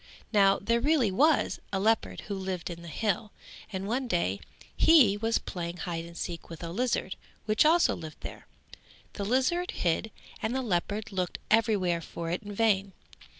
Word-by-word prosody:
Now 195 -2 +5
there 230 +3 +1
really 275 -6 +3
was 295 +10 +3
a 195 - 0
leopard 220 +3 +1
who 205 - -6
lived 190 -3 -4
in 170 0 -8
the 170 - -10
hill 210 +4 -1 0.4
and 190 0 -4
one 250 +4 -1
day 100 - 0 0.4
he 275 -12 +6
was 225 +2 +1
playing 170 -1 -5
hide 170 -2 -4
and 170 0 -11
seek 170 -1 -5
with 165 0 -9
a 165 - -4
lizard 230 -2 -1 0.3
which 215 +5 +3
also 335 +2 +4
lived 155 -3 -9
there. - - -9 0.7
The 205 - -4
lizard 265 - +1
hid 175 +6 0 0.3
and 225 +3 -1
the 265 - 0
leopard 205 +1 -1
looked 185 -2 -2
every 220 -1 +4
where 175 -3 0
for 165 +1 -5
it 180 - -2
in 205 -1 -8
vain. 200 -2 +1
200 Hz, 180 wpm, -29 LUFS, 175-230 Hz, 0.7 s, he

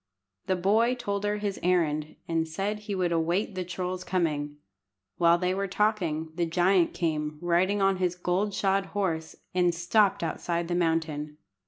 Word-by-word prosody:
The 190 - +2
boy 220 +7 +2
told 200 -4 -3
her 205 0 0
his 205 -2 -3
errand, 155 -4 +1
and 165 -1 0
said 200 +6 -2
he 210 -1 -4
would 180 -2 0
await 170 +6 0
the 185 -1 -3
troll's 185 0 -4
coming. 150 -6 -1 0.6
While 170 0 +5
they 180 +1 0
were 195 +1 -1
talking, 180 -6 0
the 170 0 -1
giant 175 +1 +2
came, 155 -3 -1
riding 185 +4 +2
on 195 -1 +3
his 180 -1 0
gold 185 +3 -1
shod 195 0 +1
horse, 160 -5 -1 0.2
and 175 -1 +2
stopped 190 +3 +2
outside 170 +1 -2
the - - 0
mountain. 160 -3 -1
180 Hz, 165 wpm, -28 LUFS, 165-195 Hz, 0.6 s, While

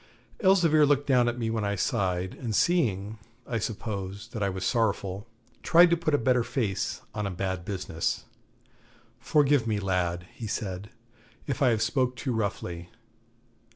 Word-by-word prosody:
Elzevir 175 -7 +5
looked 145 -1 +3
down 125 -3 +4
at 120 - -4
me 115 -2 -1
when 110 -1 -1
I 100 0 0
sighed, 95 -4 -1
and 115 -4 -4
seeing, 110 - +1 0.3
I 115 - -2
suppose, 100 -1 -5
that 110 - -6
I 100 - +1
was 95 -1 -4
sorrowful, 105 -3 0 0.3
tried 175 +1 +6
to - - +5
put 160 -3 0
a - - +4
better 125 0 +2
face 110 -7 -2
on 105 -1 -2
a - - -2
bad 95 -1 -3
business. 90 -4 -2 1.0
'Forgive 145 -5 +3
me, 105 -2 0
lad,' 90 -3 -1
he 115 - -7
said, 100 -1 -4 0.6
'if 140 +1 -3
I 135 - +5
have 110 -2 +2
spoke 125 +2 0
too 125 0 -3
roughly. 90 -5 -3
110 Hz, 160 wpm, -27 LUFS, 95-130 Hz, 1.0 s, tried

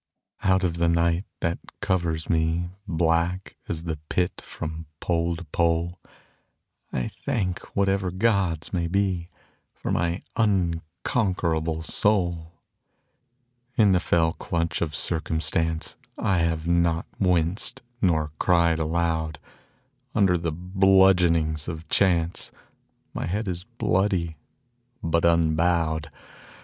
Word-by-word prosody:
Out 95 0 +3
of 85 -2 0
the 85 0 +2
night 85 +2 +2 0.2
that 85 +1 0 0.2
covers 85 -4 -1
me, 80 +2 +1 0.2
Black 85 +2 0
as 80 0 -2
the 80 -2 -3
Pit 90 0 0
from 80 +1 -6
pole 85 -1 0
to 85 - -7
pole, 85 +2 0 0.9
I 60 - -1
thank 95 -4 -2 0.2
whatever 95 -1 +2
gods 95 -5 0
may 85 -2 0
be 90 -2 0 0.5
For - - -4
my 85 +2 0
unconquerable 85 - 0
soul. 85 -4 +1 1.2
In 105 -4 +5
the 90 - +4
fell 80 -1 +2
clutch 85 -1 -2
of 75 -4 -1
circumstance 80 0 -1 0.2
I 95 -3 +1
have 80 -1 0
not 85 -1 +2
winced 90 +7 +1 0.2
nor 80 -5 +2
cried 85 -2 +3
aloud. 80 -1 0 0.8
Under 95 -3 +4
the 85 -1 -1
bludgeonings 90 -3 +3
of 80 -1 -6
chance 85 -4 +1 0.6
My - - -3
head 105 +5 -2
is 90 -1 -3
bloody, 90 -3 0 0.7
but 85 0 +2
unbowed. 80 -1 +2
85 Hz, 110 wpm, -25 LUFS, 80-90 Hz, 1.2 s, In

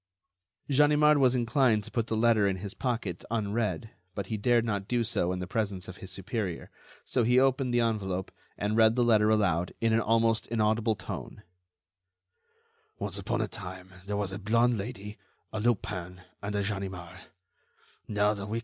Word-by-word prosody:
Ganimard 150 +1 +5
was 130 -2 +4
inclined 120 -2 +2
to - - -9
put 115 -2 -1
the 110 - -1
letter 110 -3 +4
in 95 - 0
his 95 +1 -6
pocket 115 -10 -3
unread, 110 -3 -1 0.2
but 100 - -3
he 110 - -2
dared 120 +2 +2
not 100 -3 -2
do 120 -1 +1
so 95 -5 0
in 90 - -2
the 90 - -4
presence 100 -2 -2
of 95 - -9
his 95 - -9
superior, 95 -3 -4 0.3
so 125 - 0
he 125 +2 +4
opened 135 -1 +2
the 120 0 +3
envelope 95 -5 -1 0.3
and 105 +1 -1
read 110 0 +5
the 125 - +3
letter 110 -2 +4
aloud, 95 -6 +1
in 115 -1 +2
an 115 - +4
almost 115 +1 +2
inaudible 110 0 +1
tone: 105 - -7 1.5
"Once - - -4
upon - - -1
a - - 0
time, 95 0 -8 0.2
there 105 0 -1
were 105 - 0
a 95 - -5
blonde 115 +4 +3
Lady, 105 -1 -6 0.3
a 110 - -2
Lupin, 90 -5 -2 0.2
and 100 +1 -4
a 100 - +1
Ganimard. 95 -3 -5
110 Hz, 165 wpm, -29 LUFS, 95-120 Hz, 1.5 s, Ganimard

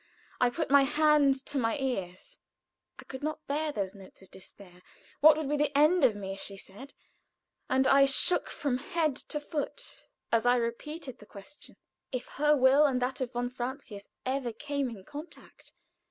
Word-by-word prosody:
I 250 - +4
put 305 +4 -3
my 280 0 +7
hands 290 -1 +3
to 285 - -3
my 230 +2 0
ears; 250 - -4 0.6
I - - -11
could 265 - -9
not 310 +1 -4
bear 300 +2 -1
those 200 -8 -3
notes 195 -1 -15
of 190 - -20
despair. 185 -1 -14 0.4
"What 305 0 +7
will 310 -3 -3
be 295 +1 0
the 290 -1 0
end 310 +3 +4
of 240 -5 +4
me?" 195 -1 -5
she 195 0 -8
said, 205 +9 -13 0.7
and 265 0 +2
I 275 +1 +6
shook 275 +6 +4
from 260 -4 -2
head 325 -4 -1
to 300 - -5
foot 310 +11 -6 0.2
as 230 -1 +3
I 245 0 +4
repeated 255 +3 -4
the 210 - -15
question. 205 +9 -13 0.4
If 255 -1 -4
her 300 0 +4
will 265 +3 +5
and 265 -3 +1
that 255 +1 -2
of 255 0 -3
von 245 0 -2
Francius 245 -5 -7 0.2
ever 260 -2 -2
came 280 +3 -3
in 200 -5 -11
contact. 300 +3 -12
270 Hz, 180 wpm, -29 LUFS, 235-295 Hz, 0.7 s, my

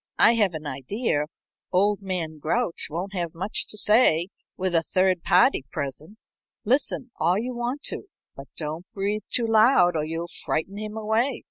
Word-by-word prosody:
I 230 - +6
have 205 -7 +2
an 155 0 -6
idea 145 - -1 0.5
old 200 +2 +2
man 170 -5 -4
Grouch 170 +5 -1
won't 180 +6 -4
have 170 -4 -3
much 190 +6 +1
to 215 - -6
say 205 -6 +4 0.3
with 185 -1 -1
a 165 - +4
third 185 +1 +1
party 180 - +4
present. 145 +9 -5 0.5
Listen 260 +1 +1
all 170 +4 +3
you 245 +4 -3
want 245 +4 -3
to, - - -3 0.3
but 135 0 -10
don't 160 +3 -4
breathe 205 +2 -1
too 240 - +1
loud 220 -5 +5
or 155 - 0
you'll 165 +2 -4 0.2
frighten 195 +6 -2
him 215 0 -6
away." 220 +5 0
190 Hz, 165 wpm, -25 LUFS, 165-220 Hz, 0.5 s, I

